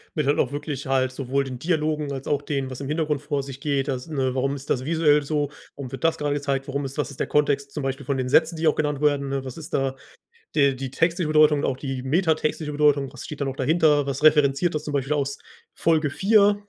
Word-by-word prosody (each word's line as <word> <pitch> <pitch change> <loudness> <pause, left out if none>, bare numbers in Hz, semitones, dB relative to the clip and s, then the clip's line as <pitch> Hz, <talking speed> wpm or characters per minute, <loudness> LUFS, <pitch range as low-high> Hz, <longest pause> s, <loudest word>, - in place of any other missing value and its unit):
Mit 150 -4 0
halt 145 - +3
auch 125 - +1
wirklich 145 -1 -4
halt 130 -1 +1
sowohl 135 +1 -1
den 130 -2 -6
Dialogen 155 -2 -1
als 135 0 -6
auch 145 -1 +1
den, 135 -2 -2
was 130 +1 -7
im 135 - -4
Hintergrund 150 -2 0
vor 145 -1 -2
sich 135 -1 -8
geht. 140 -2 0
Das, 130 -2 -3
ne 135 -4 -1
warum 135 +1 0
ist 140 0 -9
das 130 +1 0
visuell 150 -2 +3
so? 145 -1 -1 0.2
Warum 135 -3 -7
wird 135 - -7
das 165 0 +2
gerade 145 -1 0
gezeigt? 140 -1 -2
Warum 140 0 -2
ist 135 +2 -7
was 145 - -1
ist 140 - -11
der - - +1
Kontext, 140 -1 +1
zum 150 - -3
Beispiel 135 0 -3
von 140 +1 -1
den 130 -1 -2
Sätzen, 160 +5 +4
die 160 0 0
auch 155 - +4
genannt 150 -2 -1
werden? 140 -2 +1
Was 130 +4 -7
ist 160 +1 -9
da 135 -1 0 0.6
de 140 -2 +4
die 130 0 -5
textliche 165 +3 +1
Bedeutung 155 -1 +5
und - - -1
auch 130 - -1
die 135 -2 -4
metatextliche 155 0 0
Bedeutung. 145 -2 +2
Was - - -8
steht 150 -1 -7
da 140 - +1
noch 135 - -3
dahinter? 150 +1 +3
Was 140 +2 -3
referenziert 150 +2 +4
das 150 - -2
zum 150 - -5
Beispiel 140 +1 0
aus 140 -1 -2 0.4
Folge 160 -3 +2
4. 205 +1 +4
145 Hz, 250 wpm, -24 LUFS, 135-155 Hz, 0.6 s, Bedeutung